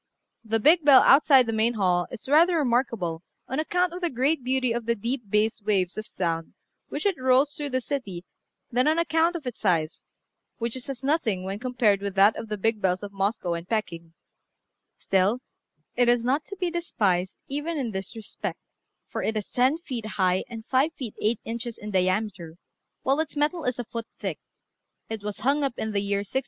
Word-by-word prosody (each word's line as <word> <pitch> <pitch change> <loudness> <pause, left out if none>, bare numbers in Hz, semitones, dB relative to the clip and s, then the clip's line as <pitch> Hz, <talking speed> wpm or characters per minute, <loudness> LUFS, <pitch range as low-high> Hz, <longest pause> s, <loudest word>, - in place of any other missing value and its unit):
The 225 0 0
big 315 +8 +5
bell 280 -3 +8
outside 275 -2 +6
the 225 - -2
main 225 +2 +1
hall 180 -4 +1
is 245 -1 -9
rather 330 +5 +5
remarkable 235 - 0 0.3
on 265 - -2
account 355 +2 +1
of 360 - -6
the 350 - +1
great 270 +3 0
beauty 255 -1 +1
of 230 -1 -3
the 235 - +2
deep 235 0 -4
bass 215 +2 +1
waves 195 -3 0
of 215 0 -5
sound 165 -3 -3 0.3
which 290 - -4
it 390 -7 +1
rolls 260 +3 +4
through 290 -1 -4
the 255 -1 0
city 205 -11 -4 0.5
than 250 +3 +2
on 315 +1 +3
account 335 +1 +2
of 320 -5 -5
its 250 - -5
size, 165 -6 0 0.6
which 235 0 -2
is 260 +1 -7
as 265 -1 -6
nothing 265 - +1
when 195 +2 -4
compared 235 -5 +2
with 200 -1 -4
that 200 +2 +5
of 225 - -7
the 210 - -2
big 220 +1 0
bells 185 +1 +1
of 200 0 -7
Moscow 195 -2 -1
and 170 +1 -6
Peking; 170 -6 -3 0.8
still 195 +4 +2 0.6
it 245 0 +3
is 240 -1 +3
not 275 +5 +1
to 400 - -8
be 360 -2 -1
despised 200 - 0
even 295 +4 -3
in 250 -5 -2
that 190 -1 -4
respect, 220 -2 -5 0.5
for - - -4
it 220 - -1
is 210 - -5
ten 255 +5 +3
feet 250 -10 -6
high 185 -1 +2
and 225 -2 -8
five 270 +5 +2
feet 240 -6 -6
eight 215 +1 +1
inches 235 0 -5
in 210 0 -7
diameter, 185 -3 -1 0.5
while 270 +3 +2
its 315 -1 -2
metal 300 +3 0
is 250 -1 -1
a 245 - -4
foot 230 0 -6
thick: - - -4 0.7
it 220 -2 -4
was 205 0 -6
hung 280 +5 +2
up 270 -3 -2
in 220 - -2
the 200 -1 0
year 200 0 0
1673. 260 +6 -1
230 Hz, 205 wpm, -26 LUFS, 200-275 Hz, 0.8 s, bell